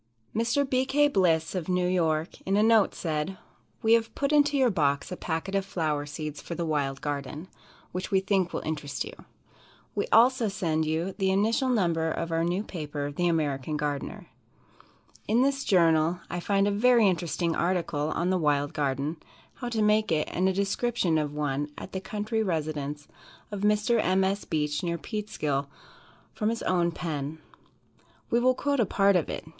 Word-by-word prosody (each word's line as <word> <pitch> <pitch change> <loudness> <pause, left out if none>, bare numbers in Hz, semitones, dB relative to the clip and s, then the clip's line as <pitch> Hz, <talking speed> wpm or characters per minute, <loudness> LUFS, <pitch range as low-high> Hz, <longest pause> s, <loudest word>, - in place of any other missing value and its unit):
Mr. 235 +5 +1
B. 260 -1 +2
K. 290 +2 +3
Bliss, 175 - +2
of 185 -2 -3
New 180 0 +1
York, 165 -3 0
in 195 +1 0
a 210 - +4
note, 225 -2 +4
said: 160 +3 -2 0.5
"We 225 0 +5
have 230 -1 +2
put 280 0 0
into 295 -1 +4
your 255 -3 +4
box 145 -5 0
a - - -2
packet 170 +3 -3
of 195 -1 +1
flower 155 -7 -2
seeds 150 0 -6
for 170 - -6
the 170 - -2
wild 140 -3 -1
garden, 145 +3 -4 0.4
which 185 +1 -4
we 195 -2 +3
think 190 -2 +1
will - - -4
interest 150 -3 -3
you. - - -8 0.8
We - - -1
also 240 +1 +5
send 165 -5 -1
you 165 +5 -1
the 190 -1 +2
initial 220 +7 +2
number 170 -9 +1
of 165 +1 -3
our 165 0 +1
new 175 +4 0
paper, 145 -6 -5
"The 175 +5 0
American 150 -3 0
Garden." 145 -2 -3 1.0
In 230 +4 +3
this 275 0 +1
journal 165 -2 +3
I 175 - -2
find 195 +2 +1
a - - +2
very 230 +1 +4
interesting 170 -2 0
article 170 -4 0
on 175 +2 0
"The 185 - +1
Wild 145 -2 +1
Garden," 140 +2 -1 0.4
how 245 - -5
to 225 -2 0
make 210 -1 +3
it, 155 -1 +1
and 185 +2 +1
a - - 0
description 195 -3 0
of 150 -1 -2
one 145 0 -1
at - - -8
the 190 - -4
country 215 +3 -2
residence 150 -6 -3 0.4
of 205 -2 -4
Mr. 210 +3 +2
M. 185 +1 +2
S. 195 +2 -1
Beach, 150 -2 -1
near 170 -2 -2
Peekskill, 155 -10 -3 0.7
from 215 - 0
his 230 0 -3
own 175 -2 +2
pen. 155 -3 -4 0.9
We 235 - +4
will 255 +1 +3
quote 285 0 0
a 230 - +4
part 200 0 +3
of 175 - +1
it. - - -5
180 Hz, 180 wpm, -27 LUFS, 155-210 Hz, 1.0 s, We